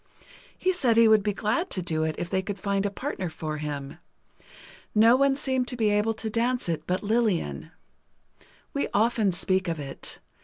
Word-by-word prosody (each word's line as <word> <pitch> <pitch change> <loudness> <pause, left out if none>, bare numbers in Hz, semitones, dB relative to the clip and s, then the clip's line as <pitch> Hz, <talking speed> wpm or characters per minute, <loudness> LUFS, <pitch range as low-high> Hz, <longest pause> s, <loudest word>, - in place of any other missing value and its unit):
He 370 0 +1
said 250 -10 +2
he 230 0 +7
would 220 -1 +6
be 210 +1 0
glad 225 - -1
to 185 - -1
do 160 -2 0
it, 155 - -2
if 175 - -3
they 190 +1 0
could 200 +1 -5
find 200 +1 0
a - - -2
partner 200 - -4
for 155 -1 -5
him. 145 -2 -5 1.0
No 225 +3 +7
one 275 +1 +3
seemed 260 -2 -1
to 250 - -2
be 215 -3 +2
able 210 +2 +1
to 220 - -5
dance 235 +2 0
it 165 -2 -3
but 185 +3 -1
Lillian. 190 - 0 1.0
We 140 - 0
often 220 -1 +3
speak 185 +1 0
of 165 -2 -2
it. 135 -2 -5
205 Hz, 190 wpm, -26 LUFS, 170-230 Hz, 1.0 s, he